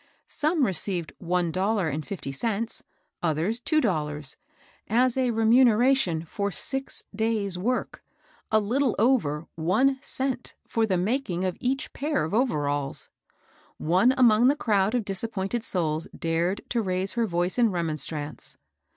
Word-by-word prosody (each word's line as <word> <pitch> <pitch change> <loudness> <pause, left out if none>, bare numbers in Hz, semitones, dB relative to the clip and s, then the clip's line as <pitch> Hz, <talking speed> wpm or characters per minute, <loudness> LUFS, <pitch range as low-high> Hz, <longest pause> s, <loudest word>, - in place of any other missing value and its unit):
Some 305 -1 +1
received 180 -3 -1
one 175 -1 0
dollar 195 +1 0
and 155 +1 -2
fifty 160 -5 -6
cents, 225 +9 -2 0.4
others 170 +8 0
two 310 +5 +1
dollars, 150 - -1 0.5
as 245 +3 +3
a 260 -2 +1
remuneration 230 -5 +3
for 200 +5 -2
six 270 +8 -3
days' 210 -4 0
work; 250 +7 -2 0.5
a 220 - +5
little 240 +4 +1
over 195 - +2
one 225 +12 +2
cent 260 -3 -3
for 225 -1 +1
the 185 -3 +1
making 190 -2 -1
of 185 - -1
each 260 +2 -2
pair 295 - -1
of 160 - -6
overalls! 145 - 0 0.7
One 185 +10 +3
among 240 -1 +5
that 285 +3 +3
crowd 210 -3 +1
of 235 -4 0
disappointed 205 +2 -2
souls 160 -5 0
dared 170 +4 0
to 235 - +1
raise 185 -1 -1
her 235 -2 0
voice 175 +4 -1
in 235 -2 +5
remonstrance. 155 -4 -1
205 Hz, 140 wpm, -26 LUFS, 170-245 Hz, 0.7 s, a